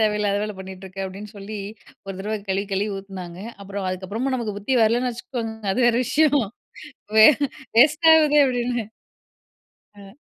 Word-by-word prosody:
தேவையில்லாத 210 -2 +1
வேல 210 0 -3
பண்ணிட்டு 190 0 -9
இருக்க 195 +1 -6
அப்டின்னு 195 +2 -8
சொல்லி, 205 +2 -7 0.5
ஒரு 195 - -5
தடவ 215 +3 -3
கழுவி 195 +1 -1
கழுவி 200 +2 0
ஊத்துனாங்க. 190 -3 -8 0.2
அப்புறம் 200 0 -6
அதுக்கப்புறமும் 205 +8 -3
நமக்கு 215 -4 -4
புத்தி 205 +6 -1
வரலன்னு 240 +3 +2
வச்சுக்கோங்க 235 -1 -5 0.2
அது 225 - -1
வேற 235 -1 +3
விஷயம். 295 -3 +3 0.8
வே 215 - +10 0.5
வேஸ்ட் 300 +6 +5
ஆவுதே 300 -2 +5
அப்டின்னு. 245 -3 -1 1.1
அ. 200 -1 -14
210 Hz, 145 wpm, -23 LUFS, 195-245 Hz, 1.1 s, வே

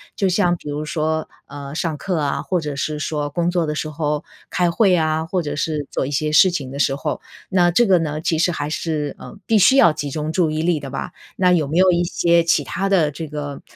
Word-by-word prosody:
就 195 - +1
像 180 -1 +2
比 160 - -12
如 145 +1 -3
说， 155 0 -2 0.2
呃， 140 0 -8
上 165 -1 -1
课 180 +4 -3
啊， 145 -3 -1
或 180 - -1
者 150 -3 -4
是 150 +2 -2
说 150 -1 -2
工 170 +4 -1
作 175 -3 0
的 150 - -2
时 155 - -3
候 150 -1 -2 0.3
开 175 -1 +1
会 190 0 +3
啊， 155 -1 0
或 180 0 -1
者 145 -1 -4
是 150 0 -2
做 - - -1
一 - - -5
些 150 +2 -1
事 185 +4 +6
情 140 -7 -4
的 140 - -6
时 135 0 +2
候， 150 +2 -4 0.3
那 180 -2 +3
这 215 +8 +3
个 185 -4 +4
呢， 155 -2 -2
其 160 0 -1
实 175 +2 +2
还 145 -3 -3
是， 150 -2 -3
呃， - - -11
必 220 -2 +3
须 230 +7 +6
要 170 - +6
集 145 -1 -4
中 155 +2 -3
注 165 -2 +1
意 155 +1 -2
力 170 -2 +1
的 140 -2 -7
吧？ 135 0 -5 0.2
那 180 -1 +3
有 165 -5 +2
没 155 +4 -2
有 185 0 +5
一 175 0 +2
些 170 -1 +2
其 165 - +2
它 195 +1 -2
的 170 -7 +3
这 160 +2 -6
个 145 -1 -6
155 Hz, 270 characters per minute, -20 LUFS, 150-175 Hz, 0.3 s, 事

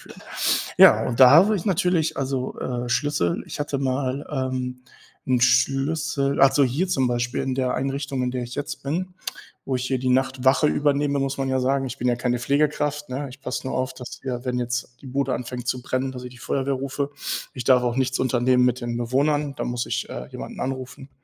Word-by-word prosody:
führen.“ - - -14 0.6
Ja, - - +7
und 120 0 -2
da 130 -1 +10
habe 210 +5 +6
ich 175 - -5
natürlich 180 -4 +1
also, 130 -1 -2
äh, 125 -1 -3
Schlüssel, 115 -8 0
ich - - -7
hatte 145 -1 -1
mal, 135 +1 -1 0.3
ähm, 125 0 -4 0.5
'n 125 -1 +3
Schlüssel 135 +2 +2
also 140 +1 +6
hier 145 +9 0
zum 130 -7 +2
Beispiel 120 0 -1
in 130 - -1
der 130 -1 0
Einrichtung, 135 0 -2
in 125 - 0
der 125 -1 -3
ich 120 +1 -8
jetzt 145 - -5
bin, 180 +6 -2 0.5
wo 130 -1 0
ich 125 - -3
hier 130 0 0
die 130 - -1
Nachtwache 130 +2 +3
übernehme, 145 -1 +1
muss 135 0 -1
man 135 -1 -1
ja 130 0 +1
sagen, 135 +1 +1
ich 130 +1 -6
bin 125 - 0
ja 120 - +2
keine 125 0 0
Pflegekraft, 150 +2 0
ne? 140 +2 -3
Ich 130 +2 -13
passe 130 +1 -4
nur - - -2
auf, 130 0 -1
dass 125 -2 -9
wir 125 -2 -4
wenn 125 -1 0
jetzt 125 0 -3
die 135 - -10
Bude 135 0 -1
anfängt 125 0 -5
zu 125 0 -1
brennen, 130 +1 -2
dass 125 -1 -8
ich 125 - -7
die 120 - -14
Feuerwehr 135 +2 -1
rufe. 140 +2 -3 0.4
Ich 125 -3 -5
darf 125 0 +5
auch 120 0 -1
nichts 130 -1 0
unternehmen 125 0 +3
mit 125 0 +1
den 120 -1 -3
Bewohnern, 140 +4 0
da - - -3
muss 120 -1 -2
ich, - - -2
äh, 60 - -6
jemanden - - -8
anrufen, 130 +1 -5
130 Hz, 215 wpm, -24 LUFS, 125-140 Hz, 0.6 s, da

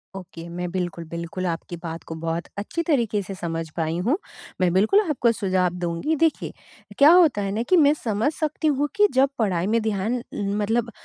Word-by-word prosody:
Okay. 170 -3 -9
मैं 180 +1 -4
बिल्कुल, 175 -2 -3
बिल्कुल 170 +2 -4
आपकी 170 0 -4
बात 165 0 -6
को - - -3
बहुत 165 +1 -2
अच्छी 210 +11 -3
तरीके 230 -8 +1
से 195 +1 -7
समझ 165 -2 -4
पाई 160 0 -1
हूँ। 290 +7 +3 0.4
मैं 180 -1 +3
बिल्कुल 215 - +4
आपको 245 -5 +2
सुझाव 185 -4 0
दूँगी। 170 - -1
देखिए, 320 - -1 0.5
क्या 290 +3 +8
होता 325 - +5
है 195 -1 -2
ना 215 +3 -1
कि 370 - +5
मैं 295 -3 +6
समझ 220 +5 0
सकती 310 0 -2
हूँ 290 0 +1
कि 415 +1 +5
जब 265 +1 +4
पढ़ाई 185 -5 +1
में 230 +2 +2
ध्यान 220 +3 -1
मतलब 210 +3 -1
205 Hz, 190 wpm, -23 LUFS, 175-260 Hz, 0.5 s, क्या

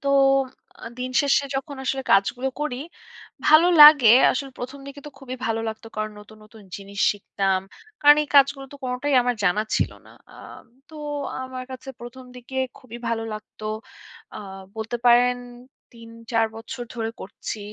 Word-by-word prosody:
তো - - 0 0.8
আ - - -8
দিন 255 0 -4
শেষে 280 0 +2
যখন 275 +1 -5
আসলে 265 +1 -1
কাজগুলো 245 +7 +2
করি 295 -4 -2 0.7
ভালো 310 +3 +7
লাগে। 295 -6 +9 0.2
আসলে 270 +1 -4
১ম 260 +3 -7
দিকে 280 +1 -10
তো - - -8
খুবই 260 -2 -7
ভালো 225 0 -1
লাগত 220 0 -7
কারণ 215 0 -3
নতুন, 210 +1 -16
নতুন 215 0 -16
জিনিস 200 0 -11
শিখতাম 195 -2 -1 0.4
কারণ 295 0 +7
এই - - -16
কাজগুলো 275 0 +4
তো 285 - -10
কোনটাই 255 +3 -1
আমার 245 0 0
জানা 200 +3 +2
ছিল - - 0 0.2
না। - - -16 0.2
আম - - -13 0.2
তো 315 - -16 0.5
আমার 260 0 -7
কাছে 260 +1 -10
১ম 240 +2 -10
দিকে 250 +2 -10 0.2
খুবই 240 -3 -11
ভালো 230 -1 -1
লাগতো 215 0 -11 0.7
আ - - -6 0.4
বলতে 220 +2 -3
পারেন 245 +1 +5 0.6
৩-৪ 230 0 -3
বছর 235 +2 -7
ধরে 225 -1 -3
করছি 200 +3 -7
245 Hz, 160 wpm, -23 LUFS, 225-270 Hz, 0.8 s, লাগে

